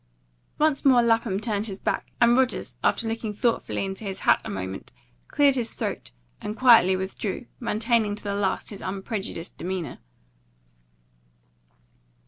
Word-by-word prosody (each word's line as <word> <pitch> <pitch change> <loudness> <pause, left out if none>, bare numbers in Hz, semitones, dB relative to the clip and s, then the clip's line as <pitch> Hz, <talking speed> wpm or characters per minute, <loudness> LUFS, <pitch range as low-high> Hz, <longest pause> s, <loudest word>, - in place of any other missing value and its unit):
Once 300 -2 +2
more 255 -3 +6
Lapham 225 -4 +2
turned 215 -1 -2
his 195 -2 -6
back, - - -2
and 235 0 +5
Rogers, 260 -1 0
after 230 - +1
looking 225 -1 -3
thoughtfully 225 -2 0
into 195 +2 -6
his 195 -2 -5
hat 120 - +4
a - - -6
moment, 95 0 -5 0.4
cleared 285 -2 +4
his 240 -3 -2
throat, - - -4 0.3
and 210 +2 -5
quietly 230 -7 +6
withdrew, 190 +4 -4
maintaining 225 -2 +1
to - - -4
the 200 -1 -2
last 200 0 -1
his 200 - -6
unprejudiced 195 -2 -5
demeanour. 180 -6 -4
210 Hz, 140 wpm, -25 LUFS, 190-235 Hz, 0.4 s, more